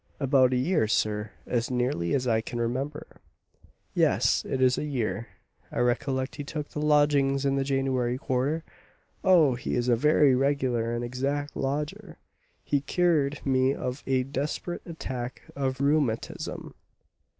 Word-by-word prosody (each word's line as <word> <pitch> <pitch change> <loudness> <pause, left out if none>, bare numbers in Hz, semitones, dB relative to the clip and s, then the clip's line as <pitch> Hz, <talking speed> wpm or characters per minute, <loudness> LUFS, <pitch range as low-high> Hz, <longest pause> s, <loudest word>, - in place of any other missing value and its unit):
"About 135 -2 +4
a - - +1
year, 155 - +2
sir, 105 -1 0 0.2
as 120 -1 -1
nearly 125 -7 0
as 130 -2 -1
I 110 -2 +2
can 120 +1 -5
remember, 130 +6 -4 0.7
yes, - - +2
it 135 - -2
is 130 -1 +4
a - - -3
year; 120 -6 -2 0.4
I - - -6
recollect 130 +3 0
he 145 - -4
took 150 +1 -5
the 150 - -5
lodgings 145 -2 +3
in 135 0 +2
the 135 - +1
January 135 -2 0
quarter. 135 +5 -1 0.6
Oh, 170 -8 +5
he 120 - -3
is 125 0 0
a 120 - +5
very 150 +2 +4
regular 130 -3 +1
and 120 0 -2
exact 140 +4 -2
lodger; 145 +2 -3 0.5
he 145 -1 0
cured 150 -3 +1
me 130 0 +2
of 125 +2 -4
a 130 -1 +2
desperate 145 +6 -3
attack 130 -7 -5
of 135 -1 -2
rheumatism." 140 -5 -1
135 Hz, 150 wpm, -27 LUFS, 125-145 Hz, 0.7 s, Oh